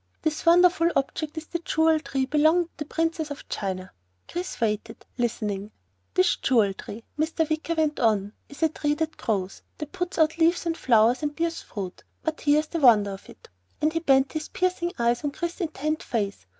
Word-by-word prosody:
This 315 +1 -2
wonderful 345 0 +6
object 305 +3 -2
is 315 - -4
the 340 - -4
Jewel 320 -1 +2
Tree 270 -3 -2
belonging 310 +5 +4
to - - -43
the 300 - -4
Princess 325 0 -1
of 285 - -8
China." 185 -2 -4 0.4
Chris 355 +1 -5
waited, 225 0 -2
listening. 210 -4 -2 0.5
"This 185 +1 +3
Jewel 220 -6 +3
Tree," 215 +3 -9 0.2
Mr. 320 0 +1
Wicker 315 +2 -1
went 310 -2 0
on, 210 -3 +1 0.2
"is 280 +3 -6
a 320 - +5
tree 295 -1 -1
that 315 0 -2
grows, 195 -4 -2 0.2
that 300 -2 -6
puts 360 0 -4
out 320 0 +2
leaves 335 +2 +3
and 330 -1 0
flowers 235 -2 +3
and 295 -1 -2
bears 335 +1 -1
fruit, 190 -4 -7 0.2
but 320 0 -3
here 290 0 +4
is - - -10
the 335 +2 -4
wonder 220 -7 +5
of 195 - -10
it," - - -15 0.3
and 310 +1 +1
he 330 - +1
bent 270 -4 +3
his 310 0 -4
piercing 365 -1 0
eyes 235 +2 +1
on 290 - 0
Chris's 340 +6 -4
intent 310 -1 -2
face. 205 - -3
300 Hz, 195 wpm, -26 LUFS, 230-325 Hz, 0.5 s, wonderful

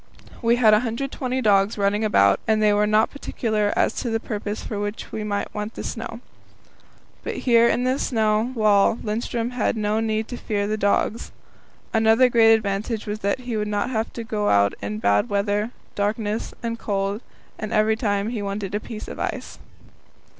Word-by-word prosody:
We 235 0 +3
had 225 -3 +5
120 255 +3 -1
dogs 200 0 +3
running 205 +1 +1
about, 100 - +4
and 220 -1 +3
they 210 -1 +4
were 210 0 +2
not 215 +1 +3
particular 215 -6 -1
as - - +2
to 240 - -2
the 225 0 0
purpose 210 -1 -4
for 210 - -4
which 205 +1 -5
we 215 - -4
might 205 -1 -3
want 210 +2 -5
the - - -6
snow. 230 0 -6 1.0
But - - -4
here 235 -2 +4
in 245 - +1
this 255 +2 0
snow 220 0 +1
wall 210 -2 +4
Lindström 230 +2 -3
had 245 -2 0
no 215 0 0
need 220 0 -1
to 245 - -5
fear 205 -4 -2
the 215 +1 -1
dogs. 210 +2 0 0.6
Another 225 +3 +5
great 225 -2 +6
advantage 215 +1 -2
was 210 0 -4
that 200 +4 -1
he 245 -2 -4
would 210 -1 -1
not 210 +4 -1
have 225 -2 -1
to 235 - -5
go 210 -2 -1
out 100 0 +4
in 105 +1 -4
bad 100 -1 +2
weather, 205 +2 0 0.2
darkness, 210 +1 -2
and 230 0 -3
cold, 200 +1 -2 0.4
every 215 0 +1
time 205 -2 -1
he 230 -3 -3
wanted 200 -1 -4
a 210 - 0
piece 215 0 -8
of - - -8
ice. - - -4
215 Hz, 180 wpm, -23 LUFS, 205-230 Hz, 1.0 s, great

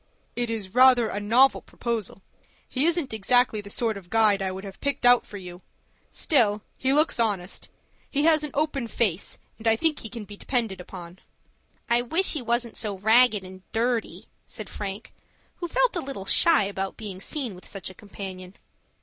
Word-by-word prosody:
"It 240 -1 -2
is 210 -4 -4
rather 250 -2 +6
a 205 - -3
novel 240 +6 +4
proposal. 225 -5 -4 0.4
He 275 +4 +1
isn't 335 -7 0
exactly 225 +1 +2
the 200 - -11
sort 220 0 -1
of 180 -3 -12
guide 215 -2 +3
I 190 - 0
would 190 +1 -6
have 195 -1 -10
picked 280 -3 -1
out 245 0 +6
for 205 - -8
you. 180 -1 -10 0.5
Still 215 -8 +2
he 265 - 0
looks 300 -2 +2
honest. 200 -5 -2 0.4
He 285 - 0
has 315 -1 +4
an 300 - -3
open 285 -4 0
face, 205 -5 -1 0.2
and 225 - -4
I 225 - +5
think 295 -4 -1
can 230 -2 -6
be 205 - -10
depended 225 -8 -2
upon." 180 0 -10 0.7
"I 235 +1 +3
wish 325 +11 +1
he 300 - -2
wasn't 235 0 -1
so 210 -3 -2
ragged 220 +1 +4
and 185 0 -11
dirty," 235 0 -1 0.2
said - - -7
Frank, 200 +1 -6 0.4
who 345 - -4
felt - - +2
a 345 - 0
little 265 -9 -6
shy 330 +3 +5
about 195 -1 -4
being 195 -4 -7
seen 260 -2 -2
with 180 - -12
such 195 -1 -6
a - - -13
companion. 190 -2 -9
225 Hz, 185 wpm, -26 LUFS, 195-255 Hz, 0.7 s, rather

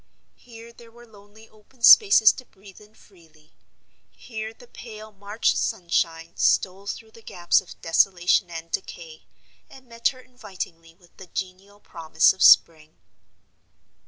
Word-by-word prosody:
Here 230 -1 -15
there 235 0 -17
were 240 +1 -18
lonely 215 0 -19
open 220 +3 -25
spaces 390 - +7
to 255 - -13
breathe 195 -1 -18
in 210 +1 -21
freely; 160 -7 -24 0.6
here 220 -2 -8
the 235 +2 -19
pale 215 -3 -13
March 205 +2 -2
sunshine 165 -2 -3
stole 195 +1 0
through 220 +1 -8
the 230 - -18
gaps 175 -5 0
of 180 - -16
desolation 175 +2 +1
and 165 0 -9
decay, 165 -4 -8 0.5
and 265 -1 -17
met 230 0 -2
her 255 - -5
invitingly 180 -9 -10
with 175 -1 -26
the 190 - -13
genial 190 +3 -8
promise 160 -4 0
of 190 - -15
spring. 155 -1 +4
200 Hz, 140 wpm, -23 LUFS, 170-225 Hz, 0.6 s, spaces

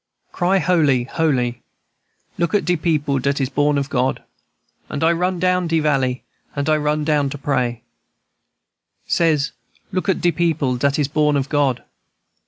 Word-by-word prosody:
"Cry 185 +2 +1
holy, 155 -8 +2
holy! 125 -4 -1 0.8
Look 170 +4 +1
at 205 - +1
de 180 - +2
people 150 -4 0
dat 140 +2 0
is 135 -2 0
born 145 +1 +1
of 140 -1 -1
God. 130 -2 -1 0.7
And 140 - -3
I 165 - +4
run 180 +2 0
down 180 0 +1
de 165 0 +1
valley, 135 -4 0 0.3
and 140 0 -2
I 155 0 +3
run 150 0 0
down 150 -2 +1
to 145 - -6
pray, 125 -4 -1 1.2
Says, 155 -4 +1 0.4
look 185 +1 -2
at 190 - +1
de 175 - +2
people 155 -6 0
dat 140 +2 +1
is 145 -3 +1
born 150 0 +1
of 135 0 -2
God. 140 -4 +1
150 Hz, 165 wpm, -20 LUFS, 135-165 Hz, 1.2 s, I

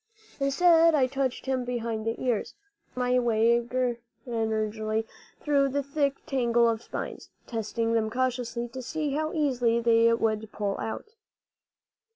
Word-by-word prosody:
Instead 330 +4 +5
I 270 -3 +4
touched 265 -1 -2
him 260 -1 0
behind 230 -3 -3
the 225 - -2
ears, 245 -5 -1 0.4
feeling 250 0 0
my - - +5
way 235 0 +3 0.7
gingerly 220 -1 -1 0.3
through 280 -2 +2
the 285 +1 -1
thick 280 0 -1
tangle 235 -3 +2
of 225 -1 0
spines, - - -6 0.2
testing 225 0 -2
them 220 -1 +1
cautiously 245 -1 -2
to 260 +2 -7
see 300 +3 -3
how 310 +2 -1
easily 250 -7 +1
they 230 0 +4
would 220 -2 0
pull 200 -2 -2
out. 430 - -5
240 Hz, 140 wpm, -27 LUFS, 225-275 Hz, 0.7 s, Instead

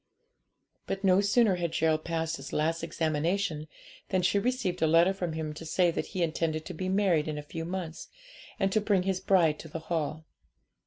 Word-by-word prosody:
But 195 - -3
no 190 0 +5
sooner 205 -1 +3
had 170 -2 -2
Gerald 160 -1 +1
passed 165 -1 -1
his 135 - -9
last 165 +2 0
examination 160 +1 -1 0.4
than 185 -1 +1
she 200 +3 +3
received 210 -6 -1
a 160 - +4
letter 170 +4 +5
from 175 -4 -3
him 155 -1 -3
to 155 - -9
say 175 +2 +2
that - - -3
he 185 -3 -2
intended 160 -1 -1
to - - -6
be 185 +3 -3
married 185 -6 +2
in 155 -1 -3
a 150 - -5
few 165 +2 -6
months, 175 -2 -5 0.5
and 195 0 +2
to 215 - +2
bring 205 -3 +2
his 190 -1 0
bride 170 -7 +3
to - - -8
the 160 +2 -6
Hall. 160 -1 -3
170 Hz, 200 wpm, -29 LUFS, 160-190 Hz, 0.5 s, no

